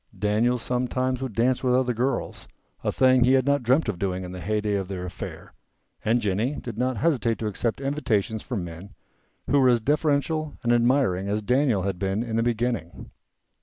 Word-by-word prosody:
Daniel 110 +4 +1
sometimes 125 +1 -1
would 130 -4 -4
dance 125 +3 +1
with 125 -1 +3
other 125 -1 +2
girls, 125 +4 -2 0.4
a - - +1
thing 130 -1 +4
he 130 +2 +4
had 130 -1 +3
not 140 0 +2
dreamt 130 +5 +2
of 100 -5 -3
doing 95 -1 -2
in 90 - -7
the 90 0 -7
heyday 105 +1 -1
of 95 -2 -1
their 90 -2 -5
affair, 90 - -8 0.5
and 115 +2 +2
Jennie 105 +7 0
did 120 -6 -6
not 125 +1 -1
hesitate 120 -6 +1
to 110 - -4
accept 110 +3 -2
invitations 120 -7 -1
from 115 -8 -4
men 85 +4 -9 0.5
who 145 - +3
were 130 -1 +5
as 120 -1 +4
deferential 150 +3 0
and 120 0 +3
admiring 120 -6 +2
as 105 +1 -1
Daniel 125 -4 +2
had 95 -2 -2
been 95 +4 -1
in 115 -2 -4
the 115 - +2
beginning. 115 -7 -2
120 Hz, 195 wpm, -25 LUFS, 105-130 Hz, 0.5 s, were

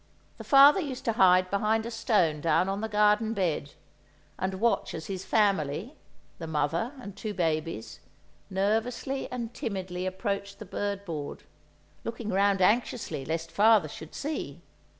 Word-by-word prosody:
The - - -6
father 280 +5 +7
used 275 -7 -5
to 230 - +1
hide 185 -2 +4
behind 215 +2 +1
a 235 - -5
stone 185 - +1
down 165 +3 +2
on 195 +1 -2
the 220 - -3
garden 210 +2 +3
bed, 160 -7 -1 0.7
and 190 +1 -1
watch 230 +5 0
as 160 - -6
his 190 -1 -5
family—the 195 - -2
mother 160 - -1
and 200 -6 -9
two 215 -2 -5
babies—nervously 180 - -3
and 240 -2 -4
timidly 185 -3 -4
approached 200 +1 -3
the 215 - -9
bird 200 +1 -3
board, 155 -5 -6 0.6
looking 230 -1 -5
round 195 -1 +2
anxiously 210 - +1
lest 165 +1 -3
father 215 -4 +5
should 155 +2 -10
see! 300 +2 -5
200 Hz, 140 wpm, -28 LUFS, 170-225 Hz, 0.7 s, father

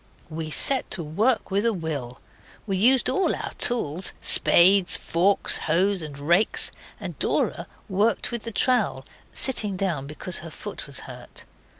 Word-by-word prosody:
We 160 0 -6
set 265 - +2
to 170 - -5
work 210 +10 -1
with 200 +2 0
a 230 -1 +1
will. 145 -9 -6 0.5
We 195 -3 -2
used 245 +7 +3
all 385 - 0
our - - -7
tools 185 -7 -1
spades, 185 +1 +6
forks, 185 +5 +2
hoes, 185 +4 +1
and 150 -3 -8
rakes 170 +9 +2 0.3
and - - -8
Dora - - -2 0.2
worked 210 +5 -1
with 235 -1 -3
the 230 - -3
trowel, 210 - 0 0.3
sitting 210 -7 0
down, 170 -8 -3
because 155 +4 -5
her 165 - -10
foot - - -9
was - - -5
hurt. - - -11
190 Hz, 155 wpm, -23 LUFS, 160-220 Hz, 0.5 s, spades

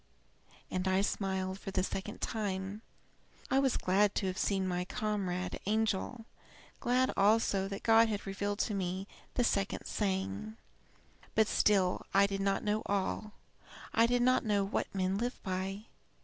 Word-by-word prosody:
And 185 +1 -1
I 190 +1 +3
smiled 190 -1 -1
for - - -6
the 190 -1 0
second 195 +3 -4
time. 200 -2 -3 0.7
I 265 - +5
was 270 -2 +2
glad 195 +2 +2
to - - 0
have 185 0 -2
seen 190 -2 +1
my 180 0 -1
comrade 190 -3 -2
angel 220 +2 0 0.5
glad 255 +2 +2
also 200 -1 +3
that 195 0 -6
God 225 0 +6
had 205 -2 -3
revealed 200 +1 -2
to 215 - -1
me 190 0 -2 0.3
the 245 - +3
second 200 -4 0
saying. 110 - -2 0.8
"But 220 - +5
I - - -7
still 190 -3 +3 0.2
did 200 0 -2
not 195 0 +1
know 210 +1 +1
all. 200 +1 -1 0.6
I 230 +1 +5
did 245 0 +2
not 255 +1 +4
know 205 -3 +2
What 195 - -1
men 190 +1 0
live 245 +2 -2
by. 190 +2 -3
200 Hz, 155 wpm, -32 LUFS, 190-215 Hz, 0.8 s, God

